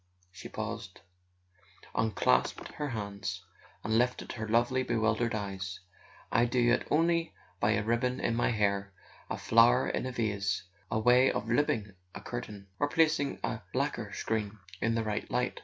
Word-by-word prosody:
." - - -41
she 90 - -10
paused, 95 -3 -6 0.9
unclasped 110 -1 +1
her 150 -1 -4
hands, 100 -5 -4 0.4
and 110 +1 +2
lifted 125 +1 0
her 110 -2 -5
lovely 120 +4 +2
bewildered 115 -1 +1
eyes, 95 -3 -4 0.5
"I 115 - +4
do 120 0 +3
it 120 - +1
only 165 +1 +2 0.2
by 105 +1 +3
a 110 - +1
ribbon 125 +3 0
in 115 - 0
my 120 - +2
hair, 100 -3 0 0.4
a - - -2
flower 120 +3 +5
in - - -1
a - - -3
vase, 100 -5 -1 0.3
a 110 - 0
way 125 +4 +5
of 110 - -3
looping 115 -5 +1 0.2
a - - -6
curtain, 105 -5 -6
or 145 - +2
placing 155 -3 +2
a - - -1 0.2
lacquer - - -1
screen 110 -1 -2 0.2
in 115 0 +1
the 115 - 0
right 105 -1 -3
light. 125 0 -1
115 Hz, 160 wpm, -31 LUFS, 105-125 Hz, 0.9 s, flower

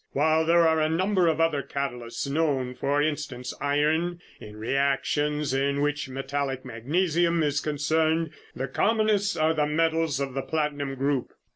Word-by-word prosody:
While 160 +3 +2
there 170 0 +5
are 160 -1 +2
a 155 - +2
number 185 +2 +2
of 160 -1 +1
other 165 -3 +2
catalysts 125 -3 -4
known, 140 -4 0
for 140 +3 0
instance 140 -5 -3
iron 155 +5 +1 0.2
in 105 0 -11
reactions 140 +4 0
in 140 +1 +1
which 145 -1 -1
metallic 135 0 -3
magnesium 165 +7 +1
is 145 -1 +1
concerned, 155 +2 0 0.2
the 135 - -3
commonest 210 - +1
are 155 +1 +3
the 150 -2 +1
metals 160 -1 +1
of 135 -2 -3
the 135 - -2
platinum 145 -2 -2
group. 135 -1 -1
150 Hz, 150 wpm, -26 LUFS, 135-160 Hz, 0.2 s, there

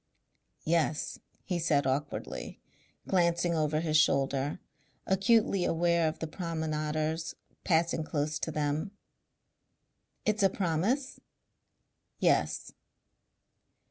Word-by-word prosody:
"Yes," 160 -2 0 0.2
he 180 -2 -2
said 150 -4 +2
awkwardly, 140 +2 -3 0.5
glancing 175 -1 +2
over 155 -1 +1
his 155 -2 +2
shoulder, 140 -1 +2 0.5
acutely 195 0 +3
aware 170 0 +2
of 155 - -2
the - - -3
promenaders 160 -1 -2 0.3
passing 165 -1 +2
close 150 -1 -2
to 160 - -2
them. 150 +4 -1 1.4
"It's 215 0 +1
a 195 - +5
promise?" 195 - -1 1.0
"Yes." - - +1
160 Hz, 90 wpm, -30 LUFS, 155-175 Hz, 1.4 s, a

